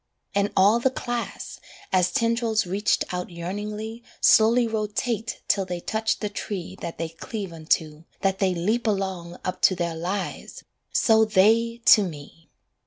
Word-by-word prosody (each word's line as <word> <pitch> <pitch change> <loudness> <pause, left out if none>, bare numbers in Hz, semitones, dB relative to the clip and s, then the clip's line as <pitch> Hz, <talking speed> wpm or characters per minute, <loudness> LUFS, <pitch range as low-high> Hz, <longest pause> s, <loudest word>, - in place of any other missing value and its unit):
And 200 +1 +1
all 205 +5 +5
the 265 - +2
class, 240 -2 -5 0.3
As 185 -1 +3
tendrils 230 -3 +1
reached 195 +4 0
out 180 0 -3
yearningly 210 +6 -5 0.2
Slowly 230 +2 +5
rotate 220 +1 -2
till 195 - +2
they 180 -1 -4
touch 220 +5 -1
the 210 - -1
tree 200 -3 -5
That 170 - -5
they 165 0 -3
cleave 190 +3 -6
unto, 160 -1 -1 0.2
that 195 -1 0
they 190 -2 +1
leap 215 +8 0
along 190 -4 -2
Up 185 0 -3
to 185 - +5
their 170 -1 -2
lives 185 +5 -4 0.3
so 220 -1 +4
they 225 +3 +3
to 215 - +8
me. 160 -2 -8
200 Hz, 150 wpm, -25 LUFS, 180-220 Hz, 0.3 s, to